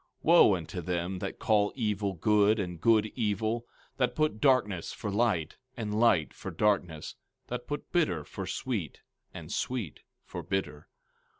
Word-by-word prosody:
15:20 -, -, -41 dB, 0.2 s
Wo 165 Hz, -, +7 dB
unto 90 Hz, +1 st, -5 dB
them 90 Hz, +2 st, -2 dB
that -, -, -5 dB
call 105 Hz, -2 st, +2 dB
evil 105 Hz, -5 st, -1 dB
good, 105 Hz, +4 st, +3 dB
and 90 Hz, -4 st, -4 dB
good 110 Hz, -2 st, +4 dB
evil, 110 Hz, +1 st, -1 dB, 0.3 s
that 125 Hz, -2 st, +1 dB
put 155 Hz, -8 st, 0 dB
darkness 105 Hz, -, +2 dB
for 105 Hz, -, -5 dB
light, 100 Hz, -7 st, 0 dB, 0.2 s
and 105 Hz, -2 st, -2 dB
light 105 Hz, -10 st, +3 dB
for -, -, -7 dB
darkness, 90 Hz, -7 st, 0 dB, 0.4 s
that 125 Hz, 0 st, -5 dB
put 145 Hz, -, -5 dB
bitter 95 Hz, -, +1 dB
for -, -, -7 dB
sweet, 105 Hz, -, -3 dB, 0.3 s
and -, -, -9 dB
sweet 115 Hz, -, -3 dB, 0.3 s
for -, -, -6 dB
bitter! 95 Hz, -6 st, -3 dB
105 Hz, 155 wpm, -29 LUFS, 90-115 Hz, 0.4 s, Wo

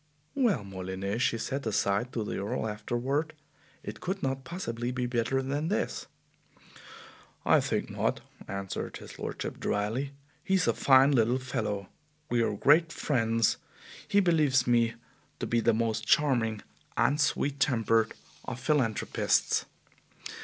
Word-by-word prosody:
"Well, 230 Hz, -, +2 dB
Molyneux," 95 Hz, +2 st, -4 dB
she 115 Hz, -, +2 dB
said 135 Hz, +2 st, -3 dB
aside 100 Hz, +3 st, +1 dB
to 115 Hz, -, -1 dB
the 105 Hz, -, -3 dB
Earl 100 Hz, +2 st, -2 dB
afterward, 120 Hz, +8 st, -2 dB, 0.5 s
"it 105 Hz, +1 st, -7 dB
could 190 Hz, 0 st, -3 dB
not 135 Hz, 0 st, -1 dB
possibly 120 Hz, -9 st, -4 dB
be 125 Hz, 0 st, -2 dB
better 120 Hz, +2 st, 0 dB
than 145 Hz, +4 st, -1 dB
this!" 205 Hz, -, -2 dB, 1.4 s
"I -, -, +6 dB
think -, -, -1 dB
not," -, -, -1 dB, 0.3 s
answered 100 Hz, -1 st, -4 dB
his -, -, -12 dB
lordship -, -, -5 dB
dryly. 115 Hz, +7 st, -1 dB, 0.3 s
"He 190 Hz, -, +1 dB
is 180 Hz, -3 st, +3 dB
a -, -, +3 dB
fine 135 Hz, +1 st, +5 dB
little 120 Hz, -1 st, +3 dB
fellow. 110 Hz, -7 st, -3 dB, 0.4 s
We 120 Hz, -1 st, +3 dB
are 115 Hz, -, +1 dB
great 160 Hz, +9 st, +4 dB
friends. 115 Hz, -7 st, +1 dB, 0.5 s
He 205 Hz, -, +4 dB
believes 155 Hz, -9 st, +3 dB
me 115 Hz, -2 st, +3 dB, 0.4 s
to -, -, -3 dB
be 120 Hz, -, +1 dB
the -, -, +3 dB
most 115 Hz, 0 st, -1 dB
charming 120 Hz, -7 st, +2 dB, 0.3 s
and 145 Hz, +2 st, +3 dB
sweet 140 Hz, -1 st, 0 dB
tempered 115 Hz, -4 st, +2 dB, 0.3 s
of 120 Hz, -, -5 dB
philanthropists. 130 Hz, -5 st, +1 dB
120 Hz, 140 wpm, -29 LUFS, 110-140 Hz, 1.4 s, I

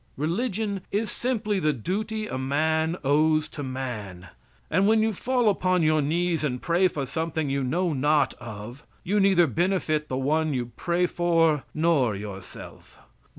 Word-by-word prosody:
Religion 200 Hz, -, -1 dB
is 210 Hz, +2 st, -1 dB
simply 215 Hz, -5 st, -1 dB
the 155 Hz, -4 st, +1 dB
duty 215 Hz, -, -3 dB
a 130 Hz, -, -5 dB
man 160 Hz, +5 st, 0 dB
owes 155 Hz, +2 st, +3 dB
to 155 Hz, -, -8 dB
man; 120 Hz, -9 st, -6 dB, 0.4 s
and 195 Hz, -, +2 dB
when 220 Hz, 0 st, +4 dB
you 220 Hz, 0 st, +1 dB
fall 245 Hz, +3 st, 0 dB
upon 185 Hz, -3 st, +2 dB
your 155 Hz, 0 st, +3 dB
knees 165 Hz, +3 st, 0 dB
and 125 Hz, -4 st, -1 dB
pray 175 Hz, +2 st, +3 dB
for 145 Hz, -6 st, -3 dB
something 160 Hz, +1 st, -2 dB
you 140 Hz, 0 st, 0 dB
know 170 Hz, +6 st, 0 dB
not 145 Hz, 0 st, +2 dB
of, 120 Hz, +3 st, -9 dB, 0.2 s
you 205 Hz, +4 st, +1 dB
neither 190 Hz, -3 st, +5 dB
benefit 160 Hz, -1 st, 0 dB
the 130 Hz, -, -3 dB
one 150 Hz, +2 st, +1 dB
you 120 Hz, -1 st, -3 dB
pray 175 Hz, +1 st, 0 dB
for 165 Hz, -4 st, +2 dB
nor 155 Hz, -9 st, +2 dB
yourself. 100 Hz, -1 st, -10 dB
160 Hz, 155 wpm, -26 LUFS, 135-185 Hz, 0.4 s, neither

